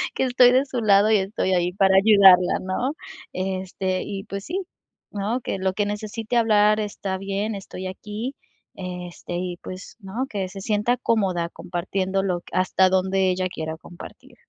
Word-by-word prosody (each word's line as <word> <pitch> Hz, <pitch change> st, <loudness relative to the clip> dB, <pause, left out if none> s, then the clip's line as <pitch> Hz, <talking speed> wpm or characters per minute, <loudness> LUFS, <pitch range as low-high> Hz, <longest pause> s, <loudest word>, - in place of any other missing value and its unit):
que -, -, +1 dB
estoy 250 Hz, -1 st, +6 dB
de 260 Hz, +2 st, +4 dB
su 255 Hz, -3 st, -3 dB
lado 205 Hz, 0 st, +5 dB
y 215 Hz, -, +6 dB
estoy 190 Hz, -1 st, -1 dB
ahí 180 Hz, 0 st, +1 dB
para 190 Hz, 0 st, +3 dB
ayudarla, 195 Hz, -3 st, +6 dB
¿no?, 215 Hz, +9 st, -2 dB, 0.4 s
este 185 Hz, 0 st, -2 dB
y 195 Hz, -1 st, -5 dB
pues 200 Hz, -1 st, -6 dB
sí, 370 Hz, +4 st, -2 dB, 0.5 s
¿no?, 210 Hz, +5 st, -2 dB
que -, -, -3 dB
lo 190 Hz, 0 st, 0 dB
que 205 Hz, +1 st, 0 dB
necesite 220 Hz, +3 st, -3 dB
hablar 215 Hz, -2 st, +4 dB
está 200 Hz, -2 st, -4 dB
bien, 200 Hz, +2 st, -2 dB
estoy 190 Hz, -1 st, -7 dB
aquí, 210 Hz, +7 st, -6 dB, 0.4 s
este, 180 Hz, -1 st, -7 dB
y 180 Hz, 0 st, -3 dB
pues, 185 Hz, +1 st, -9 dB
¿no?, 210 Hz, +7 st, -3 dB
que 195 Hz, -3 st, -3 dB
se 195 Hz, 0 st, -9 dB
sienta 215 Hz, +4 st, +1 dB
cómoda 190 Hz, -8 st, 0 dB
compartiendo 190 Hz, +3 st, -2 dB
lo 180 Hz, -3 st, -1 dB
que -, -, -17 dB
hasta 185 Hz, 0 st, +3 dB
donde 190 Hz, 0 st, +2 dB
ella 185 Hz, 0 st, -1 dB
quiera 160 Hz, -1 st, -4 dB
compartir. 170 Hz, +2 st, -13 dB
195 Hz, 170 wpm, -23 LUFS, 185-215 Hz, 0.5 s, estoy